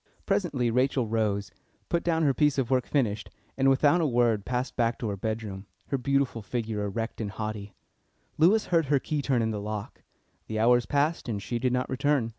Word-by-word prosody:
Presently 160 - 0
Rachel 130 +1 +2
rose, 105 -2 -1 0.4
put 170 -1 0
down 165 -1 +1
her 140 -3 +3
piece 145 +2 +2
of 135 -2 0
work 130 -2 +2
finished, 115 -8 0 0.3
and 135 0 +3
without 145 +5 +4
a 160 - +2
word 120 -5 +2
passed 125 +1 -2
back 115 -1 +1
to 115 - -3
her 100 - -2
bedroom, 105 -1 -4 0.2
her 140 - +1
beautiful 140 -2 0
figure 110 0 -3
erect 115 +3 -3
and 105 - -2
haughty. 105 -1 -5 0.6
Lewis 195 +7 +5
heard 165 -4 +3
her 145 +1 +3
key 150 +2 -2
turn 130 -4 +1
in 110 - 0
the 105 -1 -3
lock. 105 0 -6 0.5
The 110 - -3
hours 120 +2 +4
passed, 145 -1 0
and 105 -3 -2
she 120 +4 -3
did 125 +1 +1
not 125 0 0
return. 135 -2 +1
120 Hz, 200 wpm, -27 LUFS, 110-140 Hz, 0.6 s, Lewis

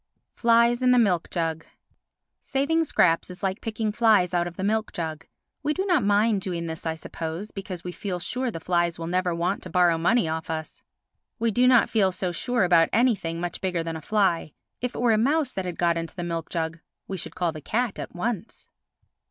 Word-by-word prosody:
Flies 235 +1 +3
in 255 - +3
the 250 - +5
Milk 190 -8 +2
Jug 160 -2 -2 0.8
Saving 285 +5 +1
scraps 165 - +2
is 180 +3 -10
like 190 +1 -1
picking 220 -1 -2
flies 215 -5 +3
out 175 0 +1
of 175 - -8
the 190 - -4
milk 220 +2 0
jug. 160 -2 -5 0.3
We 300 +1 0
do 380 - -1
not 355 -8 +3
mind 205 0 +3
doing 175 -3 -3
this, 160 0 -5
I 160 - -1
suppose, 165 +5 -6
because 190 -3 -7
we 180 - -4
feel 185 0 -4
sure 250 +8 -2
the 165 - -5
flies 170 0 0
will 165 - -5
never 180 +1 0
want 175 +4 -1
to - - -8
borrow 175 -3 +3
money 180 +3 +3
off 160 0 -3
us. 155 -1 -5 0.6
We 230 0 +1
do 245 +4 +3
not 250 -2 +6
feel 200 -4 +2
so 185 0 -2
sure 240 +5 0
about 170 -2 +4
anything 210 -8 +1
much 175 0 -4
bigger 180 -3 -1
than 165 0 -4
a 160 - -6
fly. 190 -5 +1 0.3
If 250 0 -3
it - - -4
were 240 -2 +4
a 215 - +3
mouse 280 +3 +1
that 190 - -3
had 180 -2 -4
got 170 -1 +2
into 165 0 -6
the 175 - -4
milk 165 -1 -3
jug, 165 0 -3 0.3
we 195 - -4
should 185 - -6
call 175 -2 0
the 155 -1 -9
cat 230 - -1
at - - -7
once. 220 +3 -4
185 Hz, 220 wpm, -25 LUFS, 170-230 Hz, 0.8 s, not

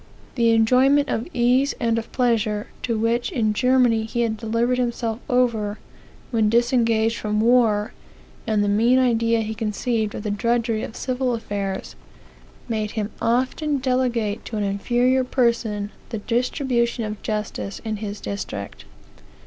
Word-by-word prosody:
The 235 -2 +2
enjoyment 255 +6 +4
of 225 - -2
ease 250 +1 +2
and 230 -1 +1
of 225 - -9
pleasure, 225 -4 +1 0.2
to 230 -2 -1
which 230 +2 0
in 215 -3 +1
Germany 245 -1 +3
he 235 +2 -2
had 225 -2 0
delivered 235 +3 0
himself 235 -2 -1
over, 230 -5 +1 0.5
when 220 -3 +2
disengaged 230 -1 +2
from 210 0 -1
war, 225 -2 +3 0.5
and 215 -2 +2
the - - 0
mean 230 +5 +3
idea 230 -2 +2
he 220 0 -3
conceived 220 0 -2
of - - -5
the 210 - -2
drudgery 230 +1 0
of 225 - -6
civil 255 -1 -1
affairs, 200 -3 -4 0.7
made 215 -3 -2
him 210 0 -2
often 260 +5 +1
delegate 250 -5 0
to 220 - -5
an 210 - 0
inferior 240 +6 +1
person 230 -5 0 0.2
the 230 - -4
distribution 240 +1 0
of 210 -1 -6
justice 210 -2 -4
in 215 -1 -2
his 205 -1 -5
district. 100 - -6
230 Hz, 145 wpm, -23 LUFS, 215-245 Hz, 0.7 s, enjoyment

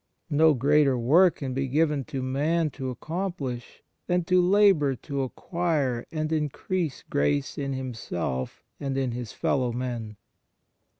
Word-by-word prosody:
No 155 +1 +5
greater 140 +1 +3
work 160 +10 +5
can 135 -3 -4
be 135 +1 -1
given 150 +1 +1
to 135 -4 -4
man 150 +5 +1
to 130 0 -5
accomplish 145 - -5 0.2
than 180 -1 +2
to 180 +2 +3
labour 180 -7 +4
to 140 +2 -4
acquire 140 -3 -1
and 155 -1 -2
increase 155 +1 -2
grace 70 0 0
in 140 -1 -3
himself 115 - -4 0.2
and 135 -1 -2
in 130 -2 0
his 120 -2 -5
fellow 125 -3 0
men. 120 -3 -4
140 Hz, 135 wpm, -26 LUFS, 125-160 Hz, 0.2 s, No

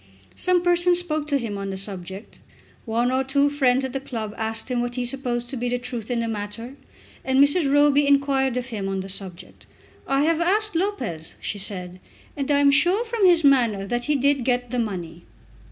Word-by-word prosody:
Some 365 -1 +1
persons 350 0 +4
spoke 310 -4 0
to 285 -2 +1
him 220 -6 -4
on 195 0 -4
the 190 - -4
subject. 190 +1 -6 0.5
One 235 +2 0
or 260 +1 +1
two 280 +2 +2
friends 265 -2 +2
at 260 - -6
the 270 - -2
club 225 -6 -6
asked 225 +2 -3
him 245 -1 0
what 245 0 -3
he 250 -1 -2
supposed 245 -2 -2
to - - -4
be 245 0 -2
the 245 - 0
truth 245 -2 -6
in 240 -1 0
the 230 - -2
matter, 225 +3 -5 0.5
and 265 0 0
Mrs. 285 +1 +3
Roby 290 0 +4
inquired 275 -2 +2
of 250 0 -4
him 205 -5 -4
on 195 -1 -2
the 190 - -8
subject. 185 -2 -8 0.4
"I 275 0 +2
have 330 +1 +1
asked 420 +3 +1
Lopez," 325 - -3
she 205 - -4
said, 185 -2 -4 0.4
"and 280 -1 -4
I 290 - +3
am 285 0 +5
sure 360 +11 +3
from 450 -4 +2
his 345 -2 +4
manner 235 -8 +3
that 240 +4 -2
he 300 - +1
did 280 -1 +2
get 245 -1 -1
the 250 - -1
money." 175 -7 -4
255 Hz, 210 wpm, -23 LUFS, 220-285 Hz, 0.5 s, am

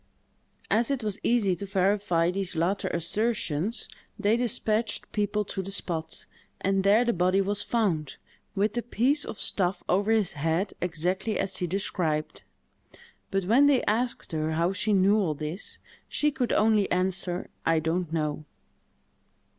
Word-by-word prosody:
As 230 +2 +3
it 270 -4 -1
was 210 -1 -2
easy 215 -6 +2
to 200 +2 -6
verify 190 -3 +1
these 195 -1 -3
latter 175 +5 0
assertions, 205 +1 -1 0.3
they 205 +1 +2
despatched 225 -2 -1
people 210 0 0
to 190 - -4
the 190 - -7
spot; 170 -5 -3 0.3
and 195 0 +1
there 210 +5 +5
the 235 - +2
body 185 +2 +2
was 200 +1 0
found, 180 - -1 0.4
with 205 +2 +1
the 240 - -1
piece 260 +5 +1
of 210 - -7
stuff 185 -1 0
over 205 +4 +2
his 215 -5 +2
head, 165 +6 -1
exactly 180 +5 -1
as 190 - -2
she 180 - -2
described. 165 -4 -1 0.9
But 195 -2 -1
when 250 +9 +5
they 280 -3 +3
asked 235 +3 -1
her 155 0 -1
how 170 +4 +1
she 210 +3 -1
knew 200 +1 +4
all 165 -7 0
this, 155 +6 -6 0.3
she 300 0 +1
could 260 -4 -1
only 215 -2 +3
answer, 180 -1 -1
"I 165 0 +2
don't 165 +1 -1
know." 155 -2 -2
195 Hz, 155 wpm, -27 LUFS, 175-215 Hz, 0.9 s, there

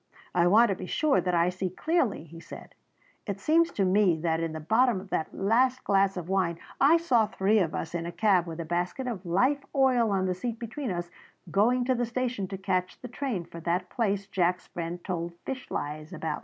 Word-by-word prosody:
"I 175 - +3
want 220 +5 +6
to 195 - 0
be 185 0 -7
sure 300 +5 +2
that 180 -1 0
I 170 +1 +3
see 185 +1 -3
clearly," 270 - 0
he 165 +1 -12
said; - - -11 0.5
"it 200 -1 -3
seems 330 +7 +3
to 195 - +1
me 185 -3 +3
that 160 -1 0
in 165 -1 -2
the 160 - -5
bottom 225 +6 +2
of 190 +1 -12
that 160 - -1
last 250 +6 +1
glass 195 -1 +2
of 175 -2 -5
wine 185 -3 0 0.2
I 295 +5 +6
saw 245 -10 +2
three 205 +3 +2
of 170 -5 0
us 165 - -4
in 170 -1 -3
a - - -4
cab 185 -3 +2
with 165 0 -6
a 170 - -3
basket 175 +10 -2
of 205 -7 -5
life 255 +11 +2
oil 255 -4 +3
on 190 -2 +1
the 185 - 0
seat 230 +5 -4
between 240 +3 -5
us 175 -2 -4 0.4
going 245 +5 +3
to 260 - +2
the 240 -1 -1
station 240 -4 -2
to 195 - -6
catch 185 -1 -2
the 250 - -8
train 245 -8 -3
for 170 - -10
that 175 +2 -2
place 200 -4 0
Jack's 180 -2 0
friend 170 +1 -6
told 170 -2 -3
fish 260 -1 -5
lies 150 +3 -5
about." 160 -2 -3
195 Hz, 225 wpm, -28 LUFS, 175-240 Hz, 0.5 s, want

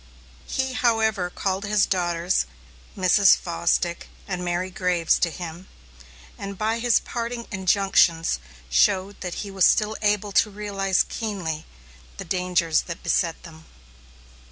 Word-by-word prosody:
He, 265 -1 -2
however, 220 -6 +1
called 190 +2 -2
his 210 -1 +2
daughters, 175 - 0 0.5
Mrs. 190 +1 +5
Fosdick 170 0 -1 0.2
and 180 -2 -3
Mary 180 +1 -2
Graves, 180 -3 +1
to 170 - +2
him, 175 +2 -8 0.7
and 200 -1 -6
by 220 +3 0
his 240 -1 +3
parting 235 0 -4
injunctions, 190 - +2 0.3
showed 185 - +2
that 180 -2 -4
he 200 - -8
was 190 -2 +3
still 215 0 +3
able 210 -1 +1
to 210 - +3
realize 195 -2 0
keenly 185 -9 -4 0.5
the - - -6
dangers 180 -3 +1
that 170 -1 -7
beset 165 -2 0
them. 160 -1 -13
190 Hz, 130 wpm, -24 LUFS, 175-210 Hz, 0.7 s, Mrs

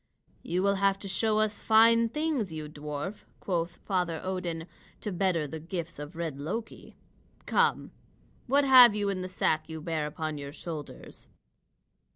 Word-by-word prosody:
"You 180 +2 -1
will 200 0 +2
have 195 0 +2
to 200 - -6
show 215 +3 +1
us 215 -1 0
fine 230 +1 +5
things, 300 - -1
you 155 -1 -5
dwarf," 150 +5 -5 0.2
quoth 170 -2 -2
Father 180 -4 0
Odin, 180 -3 -3 0.4
"to 210 - -3
better 180 -3 +1
the 155 +2 -6
gifts 170 -1 -6
of 150 +3 -8
red 165 -4 -4
Loki. 205 +10 -6 0.5
Come, - - +1 0.6
what 280 +3 +4
have 250 -5 +9
you 205 -1 0
in 190 -2 -2
the 185 - -5
sack 160 -3 0
you 160 0 -6
bear 155 -1 -2
upon 155 0 -4
your 140 0 -7
shoulders?" 155 -2 -8
180 Hz, 160 wpm, -29 LUFS, 160-210 Hz, 0.6 s, have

